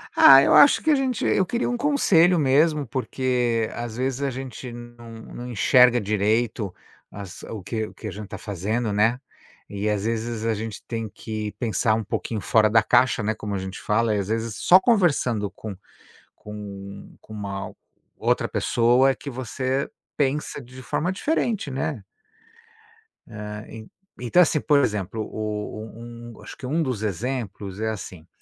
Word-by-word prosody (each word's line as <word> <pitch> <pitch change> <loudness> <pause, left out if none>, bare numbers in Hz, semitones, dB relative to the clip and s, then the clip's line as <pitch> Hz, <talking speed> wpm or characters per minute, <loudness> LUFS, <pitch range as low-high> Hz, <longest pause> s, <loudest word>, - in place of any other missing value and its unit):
Ah, 135 0 +9
eu - - +3
acho 285 - +7
que 315 - +3
a - - +5
gente 260 -5 -1
eu 195 - +3
queria 235 +6 -1
um 245 - -1
conselho 190 - +4
mesmo, 150 +1 +3
porque, 125 -2 -1
às 120 -1 -6
vezes, 130 +1 -2
a 140 - 0
gente 130 -1 -7
não 120 0 -11 0.2
não 125 - -7
enxerga 125 +1 +5
direito 105 0 0 0.4
as 100 -2 -9
o 105 -4 -7
que 110 +2 -3
o - - -14
que 110 - -8
a - - -4
gente 105 +1 -8
tá - - -7
fazendo, 105 +3 -2
né, 115 +4 +2 0.5
e, 100 +1 -2
às 105 -2 -1
vezes, 115 0 -2
a 115 - +2
gente 110 -1 -6
tem 115 -2 -4
que 110 0 -5
pensar 110 -2 0
um 110 - -2
pouquinho 105 +1 -3
fora 110 +1 +3
da 110 +1 +4
caixa, 125 +1 +3
né, 110 +1 0
como 105 -2 -5
a - - -1
gente 95 0 -6
fala 110 +1 +1
e, - - 0
às 95 - -3
vezes, 115 0 -2
só 180 +10 +6
conversando 150 - +2
com 105 0 -8 0.6
com 100 -1 -9
com 110 - -13
uma 100 -2 -5 0.4
outra - - +1
pessoa 120 +3 +3
é - - -4
que 140 - -8
você 130 +1 -2 0.3
pensa 145 +1 -1
de 125 +1 -12
forma 170 +7 -1
diferente, 220 - -1
né. 135 -3 -3 1.2
É, 105 -1 -7
en 110 -1 -11 0.3
então, 150 +9 +5
assim, 155 -3 +1
por 145 -2 +4
exemplo, 105 -4 -1
o 105 0 -5 0.5
um - - -14
acho - - -9
que 125 - -8
um 160 +5 +1
dos 130 -7 -3
exemplos 105 -2 -4
é 110 0 -1
assim, 95 -6 -7
115 Hz, 175 wpm, -24 LUFS, 105-130 Hz, 1.2 s, Ah